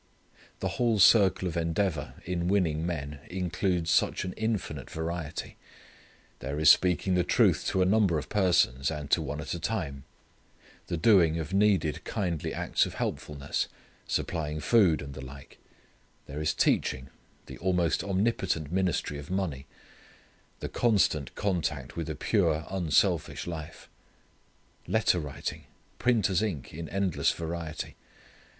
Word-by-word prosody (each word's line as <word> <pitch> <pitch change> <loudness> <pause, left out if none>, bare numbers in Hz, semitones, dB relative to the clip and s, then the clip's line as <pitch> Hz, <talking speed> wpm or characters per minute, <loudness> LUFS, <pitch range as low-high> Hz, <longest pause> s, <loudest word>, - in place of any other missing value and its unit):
The - - 0
whole 120 -3 +3
circle 95 -1 +5
of 85 - -4
endeavour 85 -2 -1
in 85 -1 -2
winning 85 -5 +1
men 75 -4 -4
includes 90 -1 -1
such 90 - +2
an 90 - -4
infinite 100 - -3
variety. 80 -1 -5 0.8
There 70 +3 -4
is 80 -1 +8
speaking 90 +1 +2
the 90 -1 +3
truth - - +3
to 95 - +2
a - - +2
number 95 -4 +3
of 75 - -4
persons, 90 -10 +2
and 75 -3 -5
to - - +4
one 75 - -4
at 75 - -4
a 85 - -4
time; 75 -11 -3 0.8
the 85 - -2
doing 85 -4 +5
of 80 +2 -4
needed 95 -7 +2
kindly 85 -6 -2
acts - - +1
of - - -9
helpfulness, 70 -1 -3 0.4
supplying 75 -2 -2
food, 95 -5 +3
and 70 0 -8
the 65 - -8
like; 70 +2 -12 0.7
there 75 +2 -6
is 75 - 0
teaching; 65 +1 +1 0.4
the - - -10
almost 90 -3 +1
omnipotent 95 -6 0
ministry 90 -5 0
of 70 - -10
money; 90 -8 -2 0.9
the - - -2
constant 100 - +1
contact 80 -9 -2
with 80 -1 -4
a 75 - -3
pure 80 +2 +1
unselfish 90 -5 +1
life; 80 -3 -7 1.0
letter 110 -5 +2
writing; 75 -4 -5 0.3
printer's 105 -7 +2
ink 90 - -3
in 80 0 -6
endless 95 -1 +1
variety. 85 -1 -5
85 Hz, 140 wpm, -28 LUFS, 75-95 Hz, 1.0 s, is